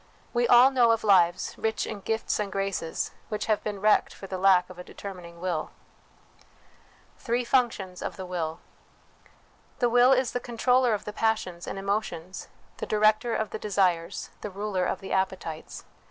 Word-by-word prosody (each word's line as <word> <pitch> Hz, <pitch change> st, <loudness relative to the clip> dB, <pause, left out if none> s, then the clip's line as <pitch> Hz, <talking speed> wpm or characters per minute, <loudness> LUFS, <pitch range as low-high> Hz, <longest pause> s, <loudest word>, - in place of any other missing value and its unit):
We 240 Hz, 0 st, +2 dB
all 245 Hz, +3 st, +7 dB
know 245 Hz, -3 st, +4 dB
of 225 Hz, -1 st, +2 dB
lives, 185 Hz, -3 st, +3 dB
rich 220 Hz, -1 st, -1 dB
in 215 Hz, -, -6 dB
gifts 220 Hz, +3 st, -2 dB
and 205 Hz, -2 st, -2 dB
graces, 195 Hz, -4 st, -2 dB, 0.2 s
which 210 Hz, -1 st, -3 dB
have 215 Hz, -2 st, 0 dB
been 205 Hz, -2 st, -4 dB
wrecked 210 Hz, +1 st, +3 dB
for -, -, -10 dB
the 190 Hz, -1 st, -5 dB
lack 185 Hz, -2 st, +5 dB
of 185 Hz, -1 st, -12 dB
a -, -, -6 dB
determining 180 Hz, -3 st, -10 dB
will. 175 Hz, -3 st, -2 dB, 1.5 s
Three 240 Hz, +1 st, -1 dB
Functions 220 Hz, -8 st, 0 dB
of -, -, -4 dB
the 190 Hz, -, -6 dB
Will. 165 Hz, -2 st, -3 dB, 1.2 s
The 245 Hz, -, +2 dB
will 245 Hz, +2 st, +5 dB
is 260 Hz, -2 st, +3 dB
the 245 Hz, -, -2 dB
controller 245 Hz, 0 st, +2 dB
of 205 Hz, -, -7 dB
the 210 Hz, -, -5 dB
passions 210 Hz, -6 st, -1 dB
and -, -, -4 dB
emotions, 195 Hz, -3 st, -3 dB, 0.3 s
the -, -, -5 dB
director 215 Hz, +2 st, +2 dB
of 220 Hz, -, -2 dB
the 220 Hz, -, -5 dB
desires, 185 Hz, -4 st, 0 dB
the 210 Hz, -, -4 dB
ruler 195 Hz, -1 st, -2 dB
of -, -, -3 dB
the 195 Hz, -, -8 dB
appetites. 190 Hz, -4 st, -3 dB
205 Hz, 170 wpm, -27 LUFS, 185-225 Hz, 1.5 s, all